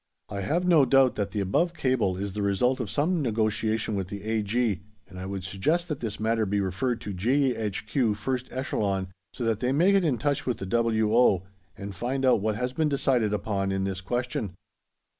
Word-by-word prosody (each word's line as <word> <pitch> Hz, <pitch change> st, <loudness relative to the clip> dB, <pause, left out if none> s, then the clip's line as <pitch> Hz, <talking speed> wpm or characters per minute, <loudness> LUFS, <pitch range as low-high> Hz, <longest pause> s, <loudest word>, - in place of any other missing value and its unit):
I 100 Hz, -, -4 dB
have 165 Hz, -, 0 dB
no 170 Hz, -5 st, +6 dB
doubt 135 Hz, 0 st, +4 dB
that 100 Hz, -2 st, -1 dB
the 105 Hz, -, -2 dB
above 165 Hz, -, +1 dB
cable 120 Hz, -, +1 dB
is 100 Hz, 0 st, -4 dB
the 105 Hz, -, -3 dB
result 115 Hz, +7 st, +1 dB
of 120 Hz, -5 st, -3 dB
some 165 Hz, +3 st, +1 dB
negotiation 110 Hz, -2 st, 0 dB
with 95 Hz, -3 st, -2 dB
the 100 Hz, +1 st, -7 dB
A.G., 110 Hz, -1 st, 0 dB, 0.3 s
and 95 Hz, -, -10 dB
I 95 Hz, -, -5 dB
would 95 Hz, -1 st, -4 dB
suggest 150 Hz, -, 0 dB
that 150 Hz, -, -3 dB
this 110 Hz, -3 st, -4 dB
matter 110 Hz, 0 st, +1 dB
be 100 Hz, +1 st, 0 dB
referred 100 Hz, +6 st, -1 dB
to 105 Hz, -4 st, -5 dB
G.H.Q., 115 Hz, 0 st, 0 dB
1st 130 Hz, +4 st, -3 dB
Echelon, 100 Hz, -7 st, -1 dB, 0.2 s
so 125 Hz, -, -6 dB
that 115 Hz, -2 st, +1 dB
they 125 Hz, +1 st, 0 dB
may 170 Hz, +8 st, +4 dB
get 195 Hz, -1 st, +4 dB
into 145 Hz, -7 st, +1 dB
touch 145 Hz, -3 st, 0 dB
with 125 Hz, -, 0 dB
the -, -, -5 dB
W.O., 110 Hz, -2 st, +3 dB, 0.3 s
and 100 Hz, 0 st, -6 dB
find 130 Hz, +7 st, -2 dB
out 125 Hz, -5 st, +4 dB
what 110 Hz, 0 st, 0 dB
has 125 Hz, +3 st, -2 dB
been 155 Hz, +2 st, +1 dB
decided 130 Hz, -6 st, +1 dB
upon 100 Hz, -1 st, -1 dB
in 95 Hz, 0 st, -1 dB
this 95 Hz, -1 st, -3 dB
question. 120 Hz, -3 st, -3 dB
110 Hz, 200 wpm, -27 LUFS, 100-130 Hz, 0.3 s, no